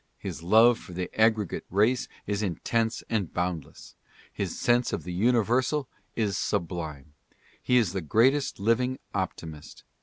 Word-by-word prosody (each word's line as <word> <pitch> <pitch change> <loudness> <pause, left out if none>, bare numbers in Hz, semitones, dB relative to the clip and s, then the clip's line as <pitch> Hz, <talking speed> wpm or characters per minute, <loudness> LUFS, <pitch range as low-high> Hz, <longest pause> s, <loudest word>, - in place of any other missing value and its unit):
His - - -6
love 110 +7 +5
for 90 - -11
the 90 +1 -4
aggregate 110 -3 +2
race 110 +7 +2 0.2
is 100 0 -1
intense 110 +4 -1
and 105 -7 -1
boundless. 90 -4 -4 0.4
His - - -3
sense 120 +1 +2
of 80 - -2
the 90 +2 -5
universal 120 +7 +2 0.3
is 105 -5 0
sublime. 80 -7 -3 0.5
He 125 - +3
is 105 -8 +2
the 95 - -2
greatest 130 - +2
living 125 +5 +1 0.2
optimist. 80 -5 -5
105 Hz, 140 wpm, -27 LUFS, 90-120 Hz, 0.5 s, love